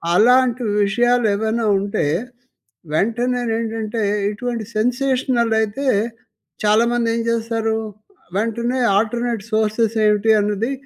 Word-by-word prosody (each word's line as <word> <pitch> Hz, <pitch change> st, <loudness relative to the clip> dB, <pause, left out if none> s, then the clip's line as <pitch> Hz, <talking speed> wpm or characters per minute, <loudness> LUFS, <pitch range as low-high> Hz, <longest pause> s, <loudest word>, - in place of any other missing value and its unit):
అలాంటి 250 Hz, +3 st, +4 dB, 0.2 s
విషయాలు 240 Hz, +4 st, +2 dB
ఏవైనా 220 Hz, +2 st, -1 dB
ఉంటే 200 Hz, -4 st, -2 dB, 0.9 s
వెంటనే 240 Hz, +7 st, 0 dB, 0.2 s
ఏంటంటే 225 Hz, -1 st, -3 dB, 0.3 s
ఏటువంటి 230 Hz, +2 st, -3 dB
సెన్సేషనల్ 245 Hz, 0 st, +1 dB
అయితే 220 Hz, +6 st, -3 dB, 0.8 s
చాలామంది 230 Hz, +3 st, +2 dB
ఏం 230 Hz, -, -1 dB
చేస్తారు 225 Hz, -1 st, -1 dB, 0.6 s
వెంటనే 235 Hz, +3 st, -1 dB, 0.2 s
ఆల్టర్నేట్ 230 Hz, 0 st, -1 dB
సోర్సెస్ 220 Hz, +1 st, +1 dB
ఏమిటి 210 Hz, +1 st, +3 dB
అన్నది 210 Hz, +5 st, -1 dB
230 Hz, 95 wpm, -20 LUFS, 215-240 Hz, 0.9 s, అలాంటి